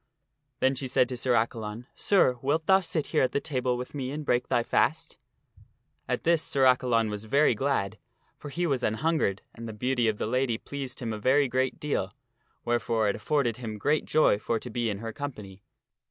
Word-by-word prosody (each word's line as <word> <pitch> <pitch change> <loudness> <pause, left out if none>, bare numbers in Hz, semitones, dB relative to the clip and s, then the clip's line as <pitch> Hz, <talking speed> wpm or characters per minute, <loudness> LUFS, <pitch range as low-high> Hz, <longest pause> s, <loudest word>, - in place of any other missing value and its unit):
Then 130 - +4
she 130 0 -4
said 125 0 +3
to 125 - -3
Sir 125 0 +1
Accalon, 115 0 -2
" - - -44
Sir, 155 -11 +3
wilt 155 +4 0
thou 190 +2 +6
sit 165 -4 -2
here - - +4
at 130 - +1
the - - +2
table 130 -5 -1
with 125 +1 -7
me 135 -3 -3
and 150 +2 -5
break 125 -1 +1
thy 120 - +1
fast? 160 +7 0 0.4
" - - -40
At - - -1
this 165 -1 +3
Sir 135 -3 0
Accalon 120 -4 +3
was 105 +1 -6
very 140 +4 +3
glad, 125 -5 -1 0.4
for 145 - -9
he 175 +5 -2
was 135 -6 0
anhungered, 115 - 0
and 115 0 -8
the 110 - -6
beauty 125 +2 0
of 110 -1 0
the - - -2
lady 125 0 0
pleased 135 0 -6
him 115 -1 -2
a 110 - -5
very 135 +5 +3
great 130 +1 -1
deal, 95 -10 -2 0.5
wherefore 115 -2 +1
it - - 0
afforded 120 0 0
him 110 -4 -6
great 145 +8 +1
joy 155 -9 +3
for 115 - -1
to 120 +2 -7
be 120 0 -1
in 100 - -2
her 115 -1 -5
company. 105 -10 -7
125 Hz, 210 wpm, -28 LUFS, 115-140 Hz, 0.5 s, thou